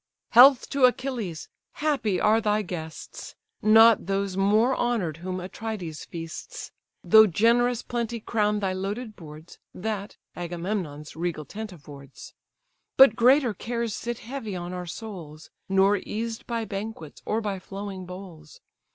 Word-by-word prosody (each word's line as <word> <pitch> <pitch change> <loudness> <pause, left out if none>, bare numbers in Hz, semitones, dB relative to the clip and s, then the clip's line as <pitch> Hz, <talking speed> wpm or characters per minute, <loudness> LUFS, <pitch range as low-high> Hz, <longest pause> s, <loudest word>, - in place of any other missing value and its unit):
"Health 255 +2 +7
to 275 -2 +4
Achilles! 245 - -1 0.3
happy 270 -11 0
are 220 +1 +3
thy 210 0 +1
guests! 160 -4 -8 0.3
Not 220 -2 +6
those 195 -1 -1
more 215 +6 +3
honour'd 215 -11 -1
whom 185 +2 -4
Atrides 185 -3 -6
feasts: 165 -2 -8 0.3
Though 220 +5 +7
generous 235 +5 +2
plenty 235 -1 -3
crown 210 -1 0
thy 190 -2 0
loaded 205 +4 -4
boards, 155 0 -12 0.2
That, 205 +1 -4 0.2
Agamemnon's 175 -3 -4
regal 165 -2 -3
tent 215 +4 -7
affords; 140 -5 -12 0.6
But 265 -5 +8
greater 250 0 +4
cares 235 +2 -3
sit 240 +2 -4
heavy 230 -5 -6
on 175 0 -5
our 180 -1 -5
souls, 170 -6 -9 0.2
Nor 195 +1 +4
eased 225 +3 -5
by 230 -2 -2
banquets 200 -7 -7
or 220 - -1
by 205 -3 -3
flowing 195 -1 -7
bowls. 180 -4 -11
205 Hz, 135 wpm, -26 LUFS, 180-230 Hz, 0.6 s, But